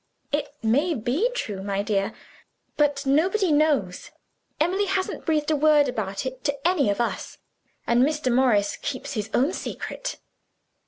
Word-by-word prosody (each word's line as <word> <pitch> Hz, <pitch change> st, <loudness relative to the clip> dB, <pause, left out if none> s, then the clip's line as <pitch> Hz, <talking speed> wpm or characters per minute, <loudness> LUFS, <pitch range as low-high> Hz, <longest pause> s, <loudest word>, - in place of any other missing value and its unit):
"It 295 Hz, 0 st, -1 dB
may 285 Hz, +10 st, +2 dB
be 265 Hz, -, 0 dB
true, 205 Hz, -, -3 dB
my 200 Hz, 0 st, -2 dB
dear; 205 Hz, 0 st, 0 dB, 0.6 s
but 290 Hz, -1 st, +1 dB
nobody 350 Hz, +7 st, +2 dB
knows. 290 Hz, -12 st, +1 dB, 0.5 s
Emily 370 Hz, +6 st, +2 dB
hasn't 375 Hz, -1 st, -2 dB
breathed 310 Hz, -1 st, +1 dB
a -, -, +3 dB
word 300 Hz, -1 st, +4 dB
about 210 Hz, -4 st, -3 dB
it 260 Hz, 0 st, -5 dB
to 285 Hz, +1 st, 0 dB
any 330 Hz, -, +2 dB
of 200 Hz, -, -1 dB
us. 235 Hz, -, -2 dB, 0.5 s
And 235 Hz, +1 st, +3 dB
Mr. 290 Hz, -2 st, +1 dB
Morris 230 Hz, -6 st, +3 dB
keeps 280 Hz, +1 st, -5 dB
his 215 Hz, -3 st, -3 dB
own 275 Hz, +10 st, +2 dB
secret. -, -, -5 dB
275 Hz, 150 wpm, -25 LUFS, 225-310 Hz, 0.6 s, word